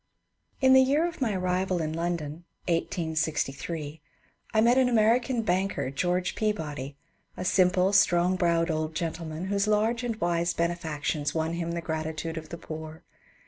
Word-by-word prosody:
In 260 0 +6
the 265 - +8
year 285 +5 +3
of 340 - -8
my 230 -5 +1
arrival 185 0 0
in 155 -1 -2
London 165 -1 -3 0.2
(1868) 160 -2 -2 0.5
I 220 - +2
met 235 +2 +5
the 260 - +4
American 240 0 +3
banker, 185 -7 0
George 180 +5 0
Peabody, 150 -10 -3 0.2
— - - -38
a - - -4
simple, 185 +1 +3
strong 180 -2 +4
browed 170 -2 +2
old 155 0 -2
gentleman, 165 0 -4
whose 200 +1 0
large 220 +3 +2
and 235 -2 -1
wise 175 -4 0
benefactions 160 -3 -2
won 160 +1 0
him 170 0 -3
the 170 - -2
gratitude 160 0 -3
of 160 -1 -7
the 170 - -6
poor. 160 0 -8
175 Hz, 155 wpm, -27 LUFS, 160-200 Hz, 0.5 s, the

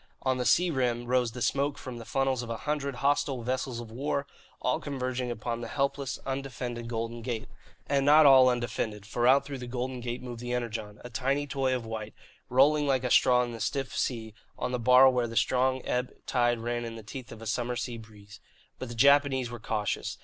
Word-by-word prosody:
On 130 -1 +1
the 125 - 0
sea 175 +8 +4
rim 120 -4 0
rose 125 -1 +1
the 125 - -3
smoke 140 +2 0
from 125 -3 -7
the 115 - -9
funnels 135 -1 0
of 120 - -7
a 115 - -3
hundred 145 -3 -1
hostile 145 -3 +1
vessels 130 0 -2
of 115 -2 -8
war, 140 +3 -2 0.3
all 125 - 0
converging 130 -3 -3
upon 120 0 -3
the - - -5
helpless, 140 -1 -1
undefended 125 -3 -4
Golden 115 0 -4
Gate. 115 -2 -4 0.4
And 140 -1 +1
not 150 +2 +7
all 130 -2 +8
undefended, 120 -4 -2
for 120 +3 0
out 135 +2 +5
through 140 -2 -6
the 125 - -7
Golden 125 +1 -3
Gate 120 +1 -5
moved 120 -2 -7
the 120 +1 -4
Energon, 115 -4 -4
a 120 - -8
tiny 135 +5 0
toy 135 -2 0
of 120 -2 -4
white, 110 -1 -6 0.3
rolling 145 +4 +4
like 130 -2 +2
a 125 - -1
straw 125 -1 +5
in 120 - -4
the 115 - -7
stiff 135 +2 -2
sea 110 -4 -2 0.2
on - - -2
the 125 - -1
bar 125 +3 +7
where 125 -3 +1
a 115 - -4
strong 130 0 +2
ebb 125 0 -1
tide 120 -1 +2
ran 120 +1 -2
in 115 -1 -6
the 110 - -9
teeth 125 +3 -8
of 115 - -8
the 115 - -10
summer 120 +3 -1
sea 120 -1 -4
breeze. 105 -1 -14 0.4
But 130 - -5
the 120 - -7
Japanese 135 -1 +4
were 120 - -7
cautious. 105 -1 -2
125 Hz, 215 wpm, -29 LUFS, 115-135 Hz, 0.4 s, all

